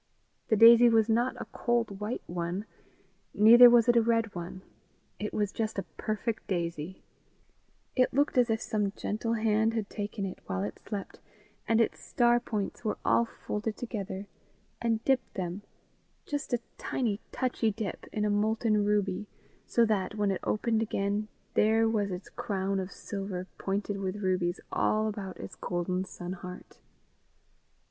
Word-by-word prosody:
The 220 - +3
daisy 235 +2 +9
was 225 -1 +3
not 235 +3 +1
a - - -5
cold 230 -5 0
white 210 +3 -3
one, 175 +3 -3 0.7
neither 235 +4 +9
was 240 -1 +5
it 240 - +5
a 235 - +6
red 230 -1 +1
one; 175 +1 -7 0.6
it 210 - -3
was 205 -2 -1
just 220 -1 -3
a 195 - -1
perfect 220 +1 -3
daisy: 170 -1 -3 0.9
it 255 -1 +3
looked 285 +2 +1
as 245 -2 +4
if 220 0 +1
some 205 -2 -1
gentle 225 +3 -2
hand 220 0 +2
had 215 -3 -3
taken 205 0 -3
it, 185 - -6
while 95 +1 -2
it 105 - -5
slept 205 -3 -6 0.5
and 225 0 +3
its 230 - 0
star 240 -1 +3
points 215 -4 -4
were 215 - -1
all 235 - +4 0.2
folded 210 +1 -2
together, 200 -5 -5 0.6
and 225 -1 0
dipped 260 -3 +1
them 185 +1 -3 0.6
just 290 -1 -4
a 240 -1 +1 0.2
tiny 220 -5 -1
touchy 245 -3 0
dip, 210 -3 -5
in 210 -1 -1
a - - +2
molten 215 +1 +2
ruby, 205 -1 0 0.4
so 235 - +4
that, 210 -3 0
when 205 -2 +1
it 190 - -2
opened 220 +1 +1
again, 205 -1 -1 0.3
there 225 +1 +4
was 210 -3 0
its 180 0 -6
crown 195 -2 -2
of 190 0 -4
silver 195 -2 -5
pointed 200 +1 -2
with 190 0 -2
rubies 180 -1 0
all 215 0 +1
about 200 -3 -5
its - - -8
golden 180 +1 -2
sun 180 -1 -6
heart. 180 0 -10
210 Hz, 160 wpm, -29 LUFS, 195-230 Hz, 0.9 s, daisy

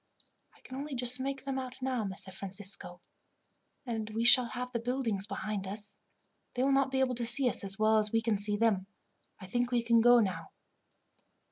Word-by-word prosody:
"I - - -24
can 260 - -10
only 285 0 -5
just 250 +1 +1
make 270 0 -4
them 270 -1 -2
out 255 0 -7
now, 255 -3 -2
Messer 190 -1 +3
Francisco, 190 -1 -3 0.8
and 225 -3 -4
as 215 - -10
we 225 - 0
shall 245 +1 +7
have 250 +1 -5
the 235 - -2
buildings 230 -5 -2
behind 210 -4 -4
us, 200 0 -5 0.6
they 250 - 0
will 275 - +2
not 275 0 +2
be 265 0 -1
able 255 -1 +1
to 240 0 -4
see 250 +3 +2
us 245 - -2
as 195 0 -5
well 220 0 +3
as 210 -1 -1
we 225 - +2
can 220 -3 0
see 205 0 +5
them. 205 -4 +1 0.5
I 190 - -10
think 240 +5 -1
we 240 -1 +1
can 230 -1 +3
go 240 +1 +6
now." 190 -5 -3
235 Hz, 210 wpm, -30 LUFS, 205-255 Hz, 0.8 s, shall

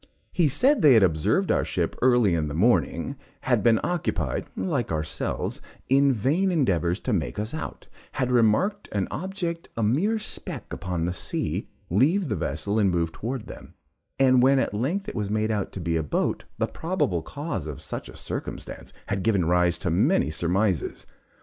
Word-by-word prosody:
He 175 -4 +3
said 255 - +3
they 145 -6 +7
had 110 - +6
observed 80 -4 +2
our - - +2
ship - - -1
early 120 -6 +4
in 80 -2 0
the 75 - -4
morning 115 - +1 0.2
had 120 -5 +2
been 115 +1 +4
occupied 175 -2 -1
(like 140 - -1
ourselves) 80 -1 -3 0.3
in 140 +1 +5
vain 145 - +1
endeavors 95 - +1
to 125 - -1
make 85 -1 -1
us 105 +4 -3
out 160 - -6 0.3
had 125 -1 -1
remarked 125 - +2
an 100 -2 0
object, 175 -1 -4
a 115 - 0
mere 165 - +2
speck 180 - -6
upon 90 -3 -2
the 90 - -1
sea, - - -3 0.2
leave 150 - +3
the 105 - 0
vessel 100 +5 -1
and 100 -2 +4
move 85 -2 0
towards 120 +3 -4
them, - - -11 0.4
and 130 -2 +5
when 135 +2 +5
at 130 - 0
length 150 - -1
it - - -4
was 105 -3 -2
made 110 +1 0
out 105 -3 -2
to - - -5
be 85 -1 -1
a - - +1
boat, 75 - -1
the - - +1
probable 160 - -1
cause 140 - -5
of 75 -3 -6
such - - -6
a - - -11
circumstance - - -6
had 100 -1 -2
given 95 -3 +2
rise 90 0 +2
to 90 -1 -2
many 80 -3 +2
surmises. 90 +3 0
110 Hz, 180 wpm, -25 LUFS, 90-140 Hz, 0.4 s, they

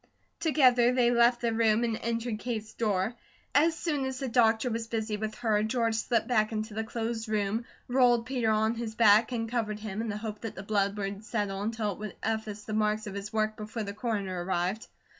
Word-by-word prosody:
Together 255 -7 +4
they 245 -1 +4
left 240 0 +4
the 235 -1 +1
room 225 0 +3
and 230 -2 0
entered 230 -1 -2
Kate's 220 -2 -4
door. 210 -1 0 0.4
As 320 +4 +4
soon 300 -5 -1
as 265 -1 -3
the 270 - -3
doctor 230 0 +3
was 225 0 -3
busy 220 -2 -2
with 215 +1 -4
her, 220 -3 +1
George 230 +1 +1
slipped 225 0 +1
back 215 -4 +2
into 215 0 -3
the 220 +1 -2
closed 225 0 -3
room, 215 +2 0 0.2
rolled 245 -2 +4
Peter 245 -3 0
on 220 +1 +2
his 230 -2 -5
back 220 +1 +5
and 225 -2 -2
covered 220 -3 -2
him, 210 0 -4
in 230 - -3
the 205 - -3
hope 210 -1 -6
that 225 - -5
the 190 - -7
blood 200 0 0
would 200 0 -4
settle 205 -3 -2
until 215 0 -1
it 195 - -8
would 210 -1 -6
efface 220 -2 -2
the 215 - -6
marks 215 0 +1
of 205 - -6
his 200 +1 -6
work 215 0 0
before 215 +1 -5
the 200 -1 -5
Coroner 200 -5 -2
arrived. 185 +4 -1
220 Hz, 215 wpm, -29 LUFS, 210-235 Hz, 0.4 s, back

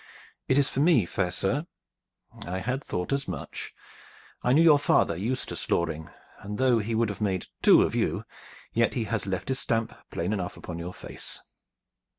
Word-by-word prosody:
"It 130 - +3
is 140 -1 +4
for - - -3
me, 145 - +5
fair 90 +1 -1
sir." 130 - 0 0.8
"I 90 +1 -2
had 125 +8 -2
thought 90 +9 -2
as 140 0 -1
much. - - -5 0.7
I 125 - +2
knew 155 +5 +6
your 155 -3 +7
father, 85 - +3
Eustace 115 +9 -3
Loring, 80 -2 0 0.3
and 105 +1 -6
though 125 -3 +4
he 110 +2 -2
would 115 -1 +2
have 100 0 -6
made 95 -3 0 0.2
two - - +7
of - - -1
you, - - 0 0.5
yet 115 0 +2
he 120 - 0
has 110 -1 -2
left 95 +5 -3
his 130 0 +1
stamp 115 -1 0 0.2
plain 90 +5 -2
enough 90 -3 -3
upon 85 -1 -7
your 90 +2 -6
face." - - -6
110 Hz, 180 wpm, -27 LUFS, 90-130 Hz, 0.8 s, your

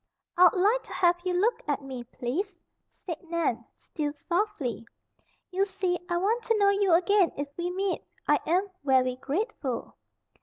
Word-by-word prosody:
"I'd 360 0 +6
like 420 +7 +3
to - - -9
have 350 -1 +3
you 365 -1 0
look 425 +7 +2
at 285 -1 -1
me, 260 -3 -6
please," 340 - -4 0.3
said 340 -4 -7
Nan, 315 -9 0
still 295 -2 -4
softly. 345 - -1 0.7
"You 380 +2 +2
see, 375 -2 -1
I 345 - +1
want 430 +7 +1
to 455 - +2
know 400 -1 +5
you 400 -2 +2
again 365 +1 +4
if 285 0 -3
we 350 0 -2
meet. 380 +1 -1 0.3
I - - +4
am 370 +5 +2 0.2
very 255 -2 +3
grateful." 275 - -3
355 Hz, 160 wpm, -28 LUFS, 285-395 Hz, 0.7 s, I'd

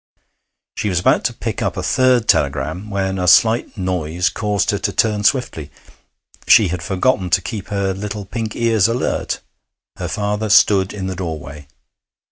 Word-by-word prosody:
She 105 - -2
was 90 -3 0
about - - +2
to - - 0
pick - - -5
up - - -2
a - - -3
third 130 -3 +2
telegram 75 +8 0
when 95 -1 -2
a 90 - -1
slight 110 +5 +3
noise 90 -2 -1
caused 105 -3 -1
her - - -2
to - - -1
turn 105 -2 0
swiftly; 100 - 0 0.8
she 105 -5 +6
had 90 0 -4
forgotten 95 +2 0
to 85 - +3
keep 110 -5 -6
her 100 -2 -1
little 100 +1 -6
pink 110 +1 -5
ears 115 -3 +2
alert. 115 +2 -2 0.6
Her - - -4
father 105 +1 -2
stood 100 -2 +4
in 100 -3 -5
the 95 0 -4
doorway. 75 -5 -7
100 Hz, 165 wpm, -18 LUFS, 90-110 Hz, 0.8 s, she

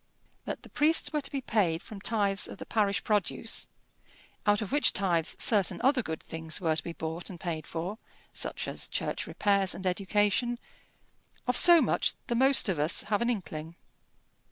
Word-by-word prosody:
That - - -5
the - - -13
priests 315 +2 +2
were 300 - 0
to 275 - -5
be 275 -2 -3
paid 185 -9 0
from 205 -3 -10
tithes 200 -3 +1
of - - -9
the - - -8
parish 205 -3 0
produce, 210 +1 -1 0.8
out 205 0 +4
of 200 - -8
which 290 -4 +3
tithes 170 -5 0
certain 205 -5 +2
other 265 0 +4
good 160 -7 -6
things 160 -1 -3
were 160 -3 0
to - - -4
be 170 - -6
bought 160 +1 -5
and 180 -3 -9
paid 160 -4 -4
for, 180 +7 -5 0.3
such - - -2
as - - -3
church - - -3
repairs 200 -2 +1
and 190 - -7
education, 205 +5 +1 0.9
of 250 - 0
so 345 +4 +8
much - - +1
the 240 - -2
most 265 +2 +4
of 185 -6 -1
us 150 +3 +3
have 205 +1 -1
an 235 - +1
inkling. 165 -7 -5
200 Hz, 180 wpm, -29 LUFS, 170-235 Hz, 0.9 s, so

